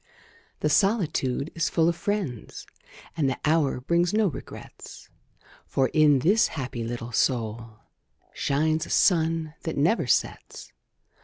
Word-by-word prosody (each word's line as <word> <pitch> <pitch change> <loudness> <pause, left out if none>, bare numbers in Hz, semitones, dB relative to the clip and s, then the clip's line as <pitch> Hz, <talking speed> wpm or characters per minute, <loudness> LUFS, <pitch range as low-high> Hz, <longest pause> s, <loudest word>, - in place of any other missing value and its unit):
The 150 - +1
solitude 160 - +1
is 165 - -1
full 165 -1 +2
of 170 - +1
friends, 185 - -4 0.5
And 150 -5 +1
the 130 - -3
hour 155 -4 +2
brings 170 +8 +1
no 220 0 +3
regrets; - - -11 0.6
For, 130 -2 +1
in 150 -2 +4
this 205 - +3
happy 130 -5 -5
little 120 +1 -5
soul, 115 -2 -1 0.6
Shines 155 +3 0
a - - -12
sun 165 -3 +2
that 160 - -4
never 170 +11 +2
sets. - - -2
155 Hz, 130 wpm, -25 LUFS, 130-170 Hz, 0.6 s, in